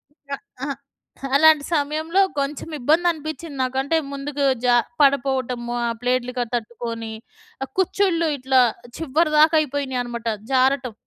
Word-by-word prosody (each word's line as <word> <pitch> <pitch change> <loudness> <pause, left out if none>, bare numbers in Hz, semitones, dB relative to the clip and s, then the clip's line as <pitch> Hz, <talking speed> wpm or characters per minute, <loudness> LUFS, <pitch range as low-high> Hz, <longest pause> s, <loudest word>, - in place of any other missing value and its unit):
ఇంక 280 -3 -19 0.3
అహా, 280 0 -2 0.6
అలాంటి 310 0 +6
సమయంలో 310 +5 +1 0.2
కొంచెం 280 +3 -3
ఇబ్బందనిపించింది 315 +1 0
నాకు. 255 +1 -2
అంటే 305 +4 +1 0.2
ముందుకు 280 +1 -3 0.2
జ - - +3 0.3
పడిపోవటము. 255 -3 +1
ఆ - - 0
ప్లేట్లు 250 0 0
క - - +1
తట్టుకొని. 230 -1 -5 0.5
ఆ - - -2
కుచ్చిళ్ళు 370 -3 +1
ఇట్లా 260 0 +2 0.4
చివరి 315 +1 +1
దాకా 315 +1 +6
అయిపోయినీయన్నమాట. 255 -5 -3 0.2
జారటం. 260 -2 +2
280 Hz, 120 wpm, -22 LUFS, 250-310 Hz, 0.6 s, అలాంటి